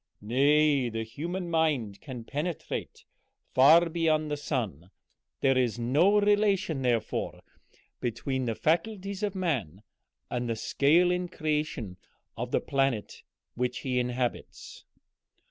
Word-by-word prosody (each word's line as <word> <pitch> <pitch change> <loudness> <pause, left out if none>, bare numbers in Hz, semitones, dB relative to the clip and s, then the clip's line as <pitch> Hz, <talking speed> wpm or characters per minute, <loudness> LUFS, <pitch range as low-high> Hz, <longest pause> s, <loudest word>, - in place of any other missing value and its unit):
Nay, 140 +3 +3
the 115 0 -3
human 170 +10 -5
mind 145 -11 0
can 125 -5 -7
penetrate 150 +7 -5 0.5
far 160 +6 +7
beyond 155 -2 0
the - - +1
sun. 110 - -3 0.5
There 135 -1 +3
is 125 -3 +1
no 150 - +3
relation, 205 -7 +2
therefore, 120 -4 -1 0.6
between 125 +2 -2
the 115 -2 -1
faculties 195 - -1
of 205 -2 -2
man 120 - -2 0.4
and 120 -1 -3
the 115 - 0
scale 160 +10 +3
in 180 0 -1
creation 150 - -3 0.4
of - - -4
the - - +1
planet 135 -6 -1 0.3
which 125 0 -2
he 125 -2 0
inhabits." 125 0 -4
140 Hz, 120 wpm, -28 LUFS, 120-165 Hz, 0.6 s, far